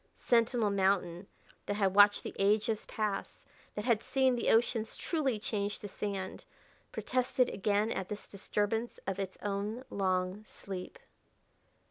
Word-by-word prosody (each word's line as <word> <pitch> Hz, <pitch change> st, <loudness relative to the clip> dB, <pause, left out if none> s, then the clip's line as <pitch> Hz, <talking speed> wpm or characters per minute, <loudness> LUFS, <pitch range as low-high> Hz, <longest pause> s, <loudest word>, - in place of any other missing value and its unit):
Sentinel 230 Hz, -2 st, +2 dB
Mountain, 190 Hz, -2 st, +1 dB, 0.4 s
that 205 Hz, -, 0 dB
had 195 Hz, -2 st, +2 dB
watched 205 Hz, 0 st, +6 dB
the -, -, -5 dB
ages 210 Hz, +2 st, +2 dB
pass, 210 Hz, -2 st, -3 dB, 0.3 s
that 210 Hz, -, -3 dB
had 230 Hz, -3 st, +3 dB
seen 265 Hz, 0 st, +2 dB
the 240 Hz, -, 0 dB
oceans 225 Hz, -1 st, +2 dB
truly 280 Hz, -9 st, 0 dB
change 205 Hz, -1 st, -2 dB
to 205 Hz, -, -7 dB
sand, 195 Hz, -1 st, -4 dB, 0.5 s
protested 255 Hz, 0 st, +1 dB
again 205 Hz, +2 st, +1 dB
at 190 Hz, -, -3 dB
this 210 Hz, -1 st, -5 dB
disturbance 210 Hz, +3 st, -2 dB
of 195 Hz, 0 st, -2 dB
its 190 Hz, -1 st, -4 dB
own 205 Hz, +4 st, -2 dB
long 185 Hz, +1 st, 0 dB
sleep. 195 Hz, -, -7 dB
205 Hz, 135 wpm, -32 LUFS, 195-225 Hz, 0.5 s, watched